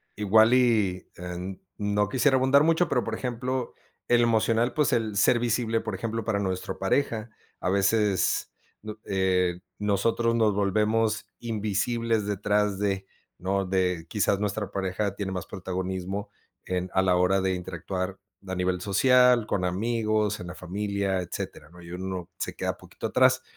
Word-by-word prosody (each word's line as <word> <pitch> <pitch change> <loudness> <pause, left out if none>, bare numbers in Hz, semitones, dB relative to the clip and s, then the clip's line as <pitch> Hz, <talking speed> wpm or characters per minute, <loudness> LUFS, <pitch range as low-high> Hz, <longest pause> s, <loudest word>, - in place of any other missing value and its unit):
igual, 110 +3 +5
y, 110 -7 +2
eh, 90 +2 -6 0.2
no 105 -1 0
quisiera 130 +3 +3
abundar 135 +2 +5
mucho, 165 +2 +3
pero, - - +1
por - - -3
ejemplo, 125 0 -3 0.3
el 120 0 +4
emocional, 115 +1 +2
pues 150 -3 +2
el 110 -3 0
ser 110 +4 +4
visible, 115 -1 0
por 110 -3 -4
ejemplo, 115 +2 -3
para 110 -3 0
nuestra 95 -2 -3
pareja, 110 +2 0 0.3
a - - -1
veces, 100 -2 +2 0.3
no, 110 0 -7
eh, 90 -2 +1 0.2
nosotros 115 +3 +1
nos 110 -3 +3
volvemos 105 +2 +1
invisibles 115 0 -1
detrás 105 0 0
de, 100 -2 -1 0.3
¿no?, 95 +1 -1
de 90 -3 0
quizás 100 -1 +1
nuestra 105 0 -2
pareja 95 +1 -2
tiene 100 -2 -3
más 90 -3 -4
protagonismo 95 +1 -4 0.4
en 90 0 -2
a 95 - +3
la 95 -1 +3
hora 90 +2 +3
de 95 0 +1
interactuar 95 +1 -4 0.3
a 95 - -3
nivel 90 0 -1
social, 125 +3 +4
con 90 -4 0
amigos, 110 +2 0
en 90 - -7
la 90 - -7
familia, 100 +1 -2
etcétera, 80 -3 -6
¿no?, 90 0 -14
y 85 0 -11
uno 95 -1 -5
se - - -3
queda - - -2
poquito - - -6
atrás. 130 0 +4
100 Hz, 155 wpm, -27 LUFS, 95-115 Hz, 0.4 s, igual